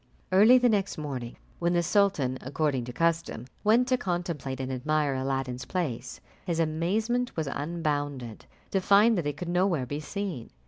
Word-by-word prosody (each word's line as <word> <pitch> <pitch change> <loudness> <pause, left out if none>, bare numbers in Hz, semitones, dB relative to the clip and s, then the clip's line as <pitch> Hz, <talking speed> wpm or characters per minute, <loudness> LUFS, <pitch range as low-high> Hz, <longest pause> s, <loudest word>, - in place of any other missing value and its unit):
Early 215 +7 +7
the 250 0 +4
next 205 -3 +1
morning, 135 -6 -5 0.2
when 175 0 +1
the 175 0 +2
sultan, 160 -10 +2
according 140 -1 -1
to 125 - -6
custom, 165 -4 0 0.2
went 230 +4 +4
to 255 - +3
contemplate 170 - -3
and 130 0 -3
admire 145 +2 0
Aladdin's 130 -1 -2
place, 150 -6 -3 0.2
his 170 -3 -2
amazement 205 +11 0
was 160 - 0
unbounded 145 -5 -3 0.2
to 195 - +1
find 205 +4 +5
that 155 - -2
it 145 -1 -3
could 175 0 -5
nowhere 175 -6 +1
be 145 +4 -4
seen. 175 - -5
160 Hz, 165 wpm, -28 LUFS, 135-190 Hz, 0.2 s, Early